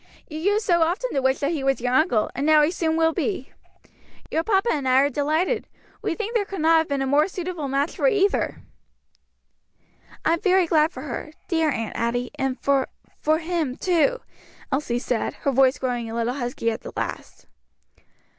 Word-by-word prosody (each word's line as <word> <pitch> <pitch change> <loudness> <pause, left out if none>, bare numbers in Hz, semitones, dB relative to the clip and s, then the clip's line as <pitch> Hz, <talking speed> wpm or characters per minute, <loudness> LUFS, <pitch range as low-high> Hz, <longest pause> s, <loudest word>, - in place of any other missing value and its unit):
You 310 -1 -6
used 410 +5 +1
so 345 -3 +3
often 360 +10 0
to 275 - +1
wish 265 0 +2
that 285 +2 +1
he 305 -5 -2
was 270 0 +1
your 245 +1 -1
uncle, 250 -7 +2
and 275 - -3
now 305 0 +5
he 300 - +2
soon 325 -2 0
will 325 0 +3
be. 370 - -3 0.8
Your 320 - +1
papa 390 +3 +2
and 285 -4 -2
I 255 +1 +5
are 285 - +2
delighted; 315 - 0 0.3
we - - -2
think 445 +3 -4
there 455 -4 +2
could 390 -3 -6
not 325 +1 +5
have 320 - -1
been 280 -1 -1
a - - -1
more 285 +3 +3
suitable 355 -5 -4
match 275 +3 -1
for - - +2
either." 405 -4 +1 1.6
"I 325 - +4
am 335 - -1
very 375 -3 +4
glad 315 -1 +3
for 255 - -8
her 305 +1 -6
dear 325 -4 +1
Aunt 225 -5 -3
Adie 245 +1 -1
and 270 -1 -1
for 275 -1 +1 0.3
for 310 +1 +2
him 320 -5 -2
too," 375 +8 +1 0.5
Elsie 265 -3 0
said, 245 -1 -2
her 280 - -1
voice 265 0 +4
growing 245 -3 -2
a 225 - -5
little 235 +1 0
husky 240 -3 -2
at 220 - -5
the - - -9
last. - - -5
305 Hz, 200 wpm, -24 LUFS, 265-345 Hz, 1.6 s, now